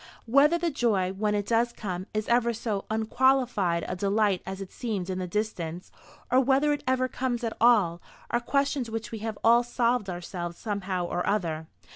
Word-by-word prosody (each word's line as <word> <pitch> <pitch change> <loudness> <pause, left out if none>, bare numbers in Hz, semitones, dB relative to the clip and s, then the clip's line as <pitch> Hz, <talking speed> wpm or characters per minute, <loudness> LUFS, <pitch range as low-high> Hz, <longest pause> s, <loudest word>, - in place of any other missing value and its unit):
Whether 280 +7 +5
the 340 -1 -1
joy, 205 -9 +1
when 210 +1 0
it 205 -1 -1
does 235 +2 +2
come, 185 -4 -5
is 215 0 -2
ever 235 0 +3
so 215 -3 -3
unqualified 220 -5 +2
a - - -3
delight 200 0 +1
as 190 0 -5
it 195 -1 -7
seemed 200 -7 -3
in 185 - -3
the 185 - -3
distance, 180 -4 -3 0.4
or 255 - +6
whether 275 +3 +3
it 290 - -4
ever 255 0 +2
comes 250 -2 -2
at 230 - -2
all, 200 -8 +4 0.3
are 240 - +2
questions 275 0 0
which 225 +1 -5
we 225 - -5
have 220 -1 -4
all 235 +1 +6
solved 240 -2 0
for 185 - -3
ourselves 175 -1 -6
somehow 195 -4 -2
or 175 +1 -2
other. 165 -6 -1
220 Hz, 190 wpm, -27 LUFS, 185-240 Hz, 0.4 s, or